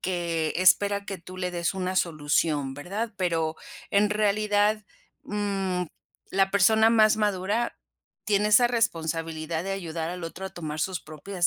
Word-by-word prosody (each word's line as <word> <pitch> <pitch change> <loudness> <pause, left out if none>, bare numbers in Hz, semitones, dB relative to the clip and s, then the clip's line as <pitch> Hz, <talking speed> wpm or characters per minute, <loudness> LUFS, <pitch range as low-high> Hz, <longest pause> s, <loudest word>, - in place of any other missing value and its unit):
que 170 -3 -1
espera 200 +2 +4
que 195 -2 -6
tú 185 +2 -11
le 180 -1 -2
des 175 +1 -2
una 185 0 -2
solución, 150 -4 0
¿verdad? 200 +10 -4
Pero 165 -4 -1 0.3
en 205 +1 +3
realidad, 210 0 +2 0.4
mm, 195 -3 -1 0.5
la 195 0 +2
persona 220 +3 +5
más 215 -2 +5
madura 210 +2 0 0.5
tiene 210 0 +2
esa 240 +3 +6
responsabilidad 165 -6 -1
de 195 - -2
ayudar 165 -4 -4
al 180 0 -6
otro 175 +3 -6
a - - -8
tomar 155 -4 -6
sus 185 +2 -1
propias 175 +4 -2
185 Hz, 145 wpm, -26 LUFS, 165-205 Hz, 0.5 s, esa